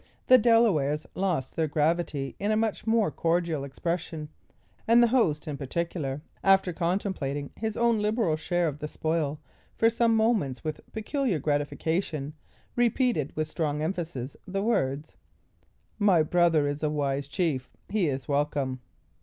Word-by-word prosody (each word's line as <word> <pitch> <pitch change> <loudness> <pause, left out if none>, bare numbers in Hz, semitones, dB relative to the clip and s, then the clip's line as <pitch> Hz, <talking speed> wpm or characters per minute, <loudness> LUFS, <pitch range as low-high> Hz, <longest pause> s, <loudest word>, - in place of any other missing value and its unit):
The 255 0 +7
Delawares 200 - +3
lost 175 -9 -1
their 160 -1 +1
gravity 150 -2 0
in 205 - -1
a 215 - +2
much 220 0 -1
more 220 -6 +3
cordial 165 -3 0
expression; 160 +2 -4 0.6
and 235 +1 +6
the 235 - +4
host, 160 - +2
in 145 -2 -3
particular, 145 -1 -3 0.2
after 195 -2 +4
contemplating 170 -6 -2
his 220 -1 -3
own 235 -2 +3
liberal 210 -5 +1
share 175 +2 0
of 150 -1 -4
the 150 - -4
spoil 155 -2 -1 0.4
for 225 0 +4
some 230 0 +2
moments 215 - +1
with 155 -1 -4
peculiar 225 - -1
gratification, 150 +1 -1 0.4
repeated 240 - +1
with 155 0 -1
strong 155 -1 -2
emphasis, 160 -7 -4
the 195 +1 -2
words: 150 - -1 0.8
"My 190 -6 +5
brother 165 -2 +3
is 145 +1 -3
a 155 - +1
wise 140 -2 -1
chief. 140 -3 -1 0.2
He 200 -5 +1
is 135 -3 -3
welcome." 140 -2 0
160 Hz, 145 wpm, -27 LUFS, 145-205 Hz, 0.8 s, The